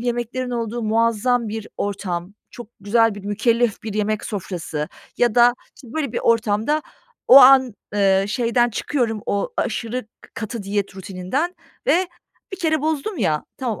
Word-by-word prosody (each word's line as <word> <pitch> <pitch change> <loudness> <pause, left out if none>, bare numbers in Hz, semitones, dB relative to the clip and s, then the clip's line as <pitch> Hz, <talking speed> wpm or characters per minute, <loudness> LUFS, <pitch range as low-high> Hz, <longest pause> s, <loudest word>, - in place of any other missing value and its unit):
yemeklerin 240 +1 -2
olduğu 235 -1 -3
muazzam 230 +2 +1
bir 220 0 -5
ortam, 190 -2 -3 0.2
çok 240 - -10
güzel 225 +2 +3
bir 200 -1 -10
mükellef 225 +2 +1
bir 215 -2 -5
yemek 215 0 -1
sofrası 175 -7 -4 0.3
ya 240 -3 +2
da, 240 0 +6 0.2
işte, 255 - -14
böyle 285 -6 -2
bir - - -1
ortamda 230 +6 +1 0.5
o 265 - +10
an, 260 -2 +7 0.2
ııı, 195 -1 +3
şeyden 240 +2 +1
çıkıyorum, 225 -3 -1
o 200 - -1
aşırı 230 +1 -2 0.3
katı 220 0 -5
diyet 200 -1 -3
rutininden 195 - -3 0.3
ve 365 +1 +3 0.4
bir 385 - -5
kere 315 -4 +1
bozdum 315 +6 -2
ya, 150 -1 0
tamam 240 -6 -3
230 Hz, 150 wpm, -21 LUFS, 205-250 Hz, 0.5 s, o